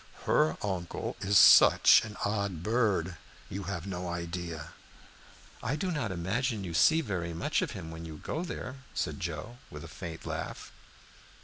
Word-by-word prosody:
"Her 80 +1 +2
uncle 95 -4 -3
is 100 +1 +3
such 85 - +8
an 105 -1 -8
odd 100 -5 -2
bird, 105 -7 +1 0.3
you 95 +1 -5
have 90 -2 -4
no 90 -2 -4
idea." 85 -2 -5 0.9
"I 135 - -1
do 180 +4 -2
not 140 - -2
imagine 105 +6 -1
you 85 -3 -5
see 160 - +5
very 90 - -3
much 85 - 0
of - - -2
him 80 - -7
when 80 0 -8
you 80 -2 -8
go 155 - -4
out 175 - -4
there," 130 -5 -6 0.2
said - - -2
Joe, 85 +8 -5
with 75 +1 -9
a - - -8
faint 80 0 -8
laugh. - - -5
90 Hz, 170 wpm, -30 LUFS, 85-110 Hz, 0.9 s, such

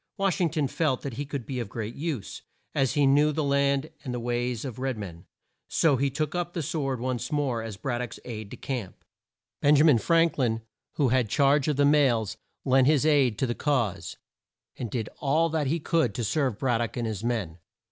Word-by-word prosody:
Wash 195 -2 +1
ing 170 - +3
ton 155 -3 0
felt 135 -2 0
that 140 - -4
he 140 +4 -5
could 140 -5 -5
be 130 +1 -4
of 115 -4 -4
great 115 0 -5
use, 140 - -4 0.3
as 135 -2 +1
he 145 -1 +3
knew 145 +3 +4
the 155 +1 -1
land 140 +1 +1
and 130 - -4
the 125 - -3
ways 120 +1 -2
of 130 -2 -6
red 130 -2 -2
men, 85 -5 -8 0.4
so 155 -4 +3
he 140 +2 +1
took 145 +2 -2
up 175 0 -2
the 165 - -2
sword 135 -4 -2
once 125 +4 -3
more, 140 -6 0
as 110 -3 -6
Brad 120 +2 -2
dock's 125 - -6
aide 110 -4 -6
de - - -9
camp. 125 -9 -5 0.6
Ben 145 +1 +5
ja 145 - +5
min 145 -8 +6
Frank 165 +2 +2
lin, 115 -3 0 0.3
who 140 -4 +2
had 125 -3 +2
charge 140 +1 +3
of 150 - +1
the 145 +1 +3
mails, 135 -8 +3 0.3
lent 130 0 +4
his 150 -1 +3
aid 140 -8 +3
to - - +1
the 120 - -1
cause, 115 - -1 0.6
and 120 - -5
did 110 -1 -3
all 155 +4 +2
that 155 -3 0
he 165 +5 0
could 155 - +1
to 120 - -2
serve 130 -1 0
Brad 125 -3 +1
dock 120 0 -3
and 120 - -1
his 110 -2 -4
men. 105 -9 -2
135 Hz, 220 wpm, -27 LUFS, 120-150 Hz, 0.6 s, min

